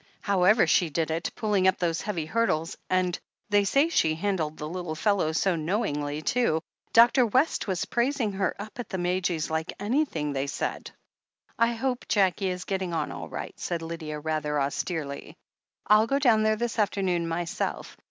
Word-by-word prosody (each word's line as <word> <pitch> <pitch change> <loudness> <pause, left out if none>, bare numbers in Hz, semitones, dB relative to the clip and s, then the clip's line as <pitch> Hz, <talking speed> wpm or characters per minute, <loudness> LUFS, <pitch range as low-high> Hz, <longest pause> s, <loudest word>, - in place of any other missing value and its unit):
"However 200 +2 +4
she 175 -3 +3
did 160 +1 -1
it, 165 +2 -1
pulling 205 -3 +1
up 190 - +3
those 165 -2 -1
heavy 180 -7 -3
hurdles 165 -4 0
— - - -46
^and 185 -1 +1 0.3
they 205 0 +5
say 275 +10 +3
she 160 - +2
handled 165 -4 -2
the 150 - -5
little 175 -1 -4
fellow 190 -2 +1
so 180 +3 +1
know 170 +7 0
ingly, 145 -5 -3
too 200 -10 +1
— - - -45
Dr. 240 +3 +6
West 255 +6 +1
was 185 -3 -1
praising 240 -2 0
her 190 -1 -1
up 215 +4 -8
at 245 - -5
the 190 - -3
Madges 175 -3 -1
like 160 0 -1
anything, 205 - 0
they 135 0 -1
said." - - -3 0.7
"I 230 +1 +3
hope 250 +1 -2
Jackie 195 -1 +2
is 180 0 -4
getting 190 -3 -2
on - - -1
all - - -7
right," - - -6
said 170 -2 -3
Lydia, 160 -2 -5
rather 150 -1 -1
austerely. 140 +1 -3 0.5
"I'll 215 +2 +5
go 275 - +1
down 240 -6 +4
there 215 0 +3
this 235 +1 -3
afternoon 190 -5 +1
myself. 165 +1 -3
185 Hz, 180 wpm, -27 LUFS, 160-215 Hz, 0.7 s, Dr